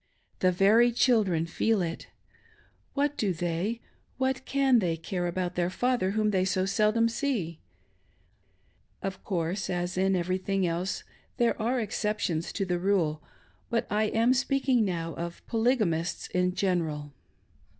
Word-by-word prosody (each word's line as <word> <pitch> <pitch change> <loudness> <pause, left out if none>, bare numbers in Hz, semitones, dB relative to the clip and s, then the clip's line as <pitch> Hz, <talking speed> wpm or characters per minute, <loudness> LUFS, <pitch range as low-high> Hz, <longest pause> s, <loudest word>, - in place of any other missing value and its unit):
The 185 - +3
very 215 +6 +5
children 215 -9 +2
feel 215 +6 +1
it. 165 -1 -5 0.9
What 290 +1 0
do 200 -4 +1
they, 175 +7 -2 0.4
what 265 0 -1
can 270 -3 +4
they, 170 -5 0
care 175 +2 -3
about 180 +1 -2
their 175 0 0
father, 245 0 0
whom 215 -1 +2
they 185 -2 +2
so 185 0 +1
seldom 215 +3 +2
see? 230 - -2 1.4
Of 195 -1 -4
course, 185 0 -2
as 175 +1 -2
in 190 0 +3
everything 185 +2 0
else, 175 +2 -2 0.3
there 235 -2 +1
are 245 +3 +1
exceptions 210 -6 -1
to 195 - -1
the 180 -1 -1
rule; 175 -5 +1 0.5
but 235 -2 0
I 210 +1 +2
am 230 +3 +3
speaking 265 -2 +2
now 165 -4 -2
of 170 0 -6
Polygamists 220 -8 0
in 180 0 0
general. 160 -7 -1
190 Hz, 140 wpm, -28 LUFS, 175-230 Hz, 1.4 s, very